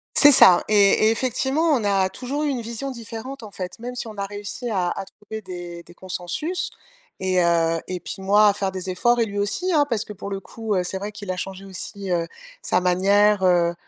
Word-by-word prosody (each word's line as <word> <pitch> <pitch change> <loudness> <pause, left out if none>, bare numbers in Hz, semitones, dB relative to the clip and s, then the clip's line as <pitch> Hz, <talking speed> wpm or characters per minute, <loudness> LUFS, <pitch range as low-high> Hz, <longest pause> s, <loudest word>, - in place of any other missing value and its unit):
C'est 290 0 +9
ça. 185 -8 +8
Et 215 - 0 0.3
et - - +5
effectivement, 265 +5 -1
on 240 -6 +1
a 195 -2 +2
toujours 265 +8 -4
eu - - 0
une 255 -4 -2
vision 235 +4 -5
différente, 235 +2 -8
en 210 - -9
fait, 185 -2 -6
même 245 +1 -6
si 235 - -5
on 215 -2 -10
a 200 - -2
réussi 205 +4 -6
à 185 -4 0
à 195 - -4
trouver 210 +2 -9
des 175 -2 -8
des 175 - -16
consensus. 185 - -4 0.5
Et, 185 -1 +1
heu, 165 -1 +2
et 185 -1 -4
puis - - -7
moi, 205 +2 +5
à 200 - +4
faire 195 -1 -2
des 185 0 -5
efforts 240 +6 +2
et 230 - +3
lui 205 -1 -4
aussi, 350 - -1
hein, 290 -2 +4
parce 225 -3 -1
que, 210 - -8
pour 200 +1 -7
le 195 -1 -3
coup, 220 0 -4
heu, 180 - +1
c'est 190 +2 -4
vrai 205 +1 -5
qu'il 205 -2 -6
a 180 - -4
changé 195 +1 -6
aussi, 195 0 -7
heu, 170 -1 0 0.3
sa - - +1
manière, 195 +3 +3
heu, 175 -2 +3
200 Hz, 235 wpm, -23 LUFS, 185-230 Hz, 0.5 s, C'est